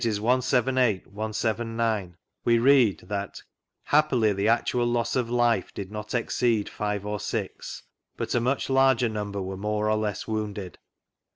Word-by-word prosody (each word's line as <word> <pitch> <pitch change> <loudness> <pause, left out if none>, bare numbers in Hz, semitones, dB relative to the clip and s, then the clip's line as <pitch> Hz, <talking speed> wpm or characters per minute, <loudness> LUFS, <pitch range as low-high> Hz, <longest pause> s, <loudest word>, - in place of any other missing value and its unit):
178, 125 0 +2
179) 110 -2 -2 0.3
we 115 0 +4
read 125 -4 +4
that 100 -1 -5 0.4
"happily 130 -8 +3
the 100 +2 0
actual 120 +1 +2
loss 120 -1 0
of 125 -3 0
life 120 -1 +1
did 100 -1 -6
not 105 +2 -5
exceed 115 -2 +1
five 105 -1 -3
or 105 0 -3
six, 105 -1 -5 0.3
but - - -3
a 120 - +3
much 130 +4 0
larger 135 -2 +4
number 105 -2 -4
were 95 +1 -5
more 105 +2 -1
or - - +3
less 105 -2 -3
wounded." 105 -5 -4
110 Hz, 145 wpm, -26 LUFS, 105-120 Hz, 0.4 s, we